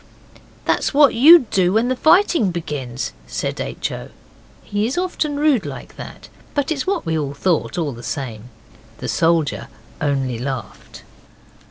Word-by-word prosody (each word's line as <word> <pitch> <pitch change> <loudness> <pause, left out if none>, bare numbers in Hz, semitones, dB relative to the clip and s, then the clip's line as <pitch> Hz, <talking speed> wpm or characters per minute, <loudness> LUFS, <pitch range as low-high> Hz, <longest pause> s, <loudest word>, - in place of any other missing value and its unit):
'That's - - 0
what 290 -1 +6
you'd 285 +3 +8
do 185 -1 +2
when 225 +3 +2
the 255 - 0
fighting 325 - +4
begins,' 135 - -4 0.2
said - - -3
H. - - -3
O. - - -7 0.5
He 205 +2 -1
is 260 - -3
often 330 -5 -1
rude 290 -7 +3
like - - -8
that - - -10 0.3
but 285 +1 0
it - - +4
was 280 +1 -4
what 390 - -1
we 160 -1 -1
all 145 -2 -2
thought, 175 +3 0
all 160 -4 -1
the 120 -2 -9
same. 120 -4 -5 0.5
The 125 - -6
soldier 165 0 +1 0.3
only 135 -5 -1
laughed. 125 -5 -6
175 Hz, 160 wpm, -20 LUFS, -, 0.5 s, you'd